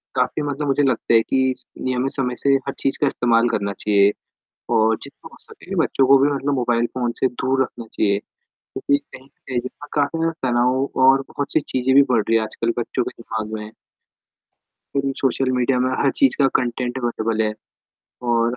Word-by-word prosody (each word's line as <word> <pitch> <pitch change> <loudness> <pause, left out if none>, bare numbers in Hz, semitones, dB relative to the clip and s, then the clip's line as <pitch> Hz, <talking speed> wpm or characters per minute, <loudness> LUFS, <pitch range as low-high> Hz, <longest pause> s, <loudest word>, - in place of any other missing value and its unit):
काफ़ी 125 +4 0
मतलब 145 0 -3
मुझे 140 +1 +2
लगता 130 -3 +1
है 115 - +6
कि 130 +2 +1 0.3
नियमित 130 +1 -1
समय 125 -3 -2
से 140 - +3
हर 140 - -2
चीज़ 135 - 0
का 145 - +4
इस्तेमाल 120 -3 +2
करना 100 -2 -1
चाहिए 100 -1 +4 0.6
और 110 0 +4
जितना - - -12
हो - - -15
सके - - -10
बच्चों 135 - +2
को 135 +1 +7
भी 145 - +4
मतलब 140 0 -1
मोबाइल 120 -2 +1
फ़ोन 120 -2 0
से 130 - +3
दूर 130 +1 -1
रखना 120 -2 -8
चाहिए, 100 -1 +1 0.4
क्योंकि 140 - -1 0.2
कहीं 130 - -11
न - - -24 0.2
कहीं 125 -2 -1
जो 125 +1 -5 0.2
है - - -18
काफ़ी 145 +2 0
ज़्यादा 165 -5 -1
तनाव 125 +3 +1
और 135 +1 +6
बहुत 145 - -4
सी - - +4
चीज़ें 130 0 +1
भी 140 - +8
बढ़ 115 -3 +4
रही 115 - +3
हैं 110 - +1
आजकल 115 +2 -2
बच्चों 120 - -1
के 120 - -8
दिमाग 110 -1 -5
में। 105 0 -6 1.2
क्योंकि 140 0 0
सोशल 130 0 +1
मीडिया 125 +1 +2
में 130 +1 +1
हर 140 - +3
चीज़ 275 -2 +4
का 140 - +5
कंटेंट 125 0 -1
अवेलेबल 115 -2 -1
है 105 0 -1 0.8
और 115 +1 +2
125 Hz, 200 wpm, -21 LUFS, 115-135 Hz, 1.2 s, भी